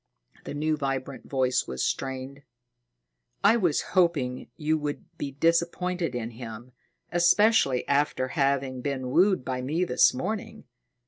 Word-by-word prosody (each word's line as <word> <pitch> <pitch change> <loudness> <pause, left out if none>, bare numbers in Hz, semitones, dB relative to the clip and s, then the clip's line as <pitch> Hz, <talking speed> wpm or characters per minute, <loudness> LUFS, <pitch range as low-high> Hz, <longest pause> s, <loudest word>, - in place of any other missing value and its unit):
The - - -5
new 155 +1 0
vibrant 135 -1 -4
voice 130 -2 +1
was 65 0 -3
strained. 135 +1 -3 1.0
"I 225 - +6
was 175 -10 +2
hoping 150 -9 +1
you 155 +1 +1
would 145 -1 -4
be 140 - -3
disappointed 170 +1 0
in 120 -1 -3
him, 115 +1 -9 0.4
especially 175 - +3
after 140 -2 +1
having 135 -3 0
been 130 -2 -3
wooed 185 -2 +3
by 130 -1 -2
me 155 +8 -1
this 125 -8 +4
morning. 200 +12 -4
140 Hz, 130 wpm, -27 LUFS, 130-170 Hz, 1.0 s, I